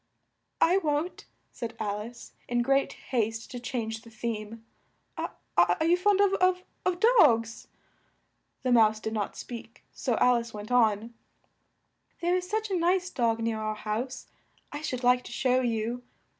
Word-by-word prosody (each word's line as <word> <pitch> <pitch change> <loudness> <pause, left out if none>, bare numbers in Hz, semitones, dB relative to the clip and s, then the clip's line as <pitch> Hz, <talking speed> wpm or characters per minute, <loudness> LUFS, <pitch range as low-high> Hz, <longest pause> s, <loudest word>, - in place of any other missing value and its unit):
"I 360 +3 +5
won't," 305 +1 -2 0.3
said 230 -1 -6
Al 210 -1 -2
ice, 235 +3 -10
in 240 0 +1
great 275 +2 +2 0.2
haste 225 -1 -1
to 245 - -5
change 225 -2 -4
the 230 - -14
theme. 225 0 -5 0.5
"Are 315 - 0
you 340 +2 +5
fond 395 +2 +2
of 400 -1 +4 0.5
of 360 -1 0
dogs?" 235 - +4 1.0
The 255 - +1
mouse 220 -2 +5
did 220 0 -4
not 210 -2 -2
speak, 235 -1 -9
so 245 -4 -1
Al 250 -1 +5
ice 230 -2 -5
went 210 +3 -7
on: 225 -2 +2 1.1
"There 345 +1 +1
is 365 0 -2
such 435 0 -1
a - - +1
nice 360 +2 +1
dog 230 -3 +1
near 225 -1 -1
our 215 0 -2
house, 230 +5 -4 0.5
I 290 - -5
should 255 -5 -3
like 250 0 +4
to - - -9
show 255 +1 +2
you! 235 0 -1
240 Hz, 155 wpm, -28 LUFS, 225-295 Hz, 1.1 s, I